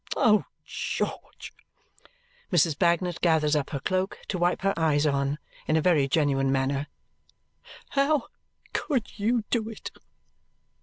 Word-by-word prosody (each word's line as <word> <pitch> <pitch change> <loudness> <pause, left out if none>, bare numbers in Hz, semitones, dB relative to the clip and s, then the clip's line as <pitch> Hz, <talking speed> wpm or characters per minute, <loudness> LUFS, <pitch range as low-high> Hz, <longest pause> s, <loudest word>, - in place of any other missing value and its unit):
Oh, 210 -2 +4 0.2
George!" - - -4 1.0
Mrs. 165 -3 +3
Bagnet 170 +2 +1
gathers 155 -3 +3
up 145 -2 -1
her 140 - -3
cloak 185 +6 -1
to 185 - -2
wipe 175 +2 +1
her 195 0 +2
eyes 155 -2 +2
on 140 0 +1 0.3
in 155 - +2
a - - +2
very 155 -7 +3
genuine 135 -2 +2
manner, 135 +2 0 1.0
"How 280 0 +1 0.4
could 255 -7 -2
you 225 +2 +1
do 225 -2 0
it?" 225 - -8
170 Hz, 130 wpm, -27 LUFS, 145-200 Hz, 1.0 s, Oh